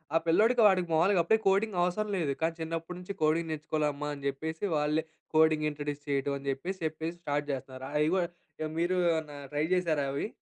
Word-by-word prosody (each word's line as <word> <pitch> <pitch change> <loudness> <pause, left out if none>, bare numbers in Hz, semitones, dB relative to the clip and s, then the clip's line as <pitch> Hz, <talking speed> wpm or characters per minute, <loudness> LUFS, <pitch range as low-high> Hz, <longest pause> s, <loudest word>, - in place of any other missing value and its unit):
ఆ - - +8
పిల్లోడికి 225 +8 +4
వాడికి 185 -3 +3
మామూలుగా 175 +3 +4
అప్పుడే 220 +6 +4
కోడింగ్ 195 0 +2
అవసరం 210 +4 0
లేదు. 145 -5 0
కానీ 165 0 +1
చిన్నప్పటి 165 +2 -4
నుంచి 180 +2 -6
కోడింగ్ 160 +1 +2
నేర్చుకోవాల 155 0 -1
అమ్మా 150 +1 -4
అని 140 -1 -9
జెప్పేసి 160 +6 -3
వాళ్ళే 150 +1 +1 0.3
కోడింగ్ 155 -1 +4
ఇంట్రొడ్యూస్ 145 0 -5
చేయడం 140 0 0
అని 140 0 -10
జెప్పేసి 180 +8 -4
చెప్పేసి 160 +2 -3
స్టార్ట్ 145 -2 -1
జేస్తున్నారు. 130 -1 -6
అవి 150 +1 +3
కూడా 175 -2 +1 0.5
మీరు 175 +2 +1 0.2
ఏమన్నా 155 -3 -3 0.2
ట్రై 150 +1 +1
జేసారా 160 -6 +1
అవి? 140 - -2
160 Hz, 185 wpm, -30 LUFS, 145-175 Hz, 0.5 s, ఆ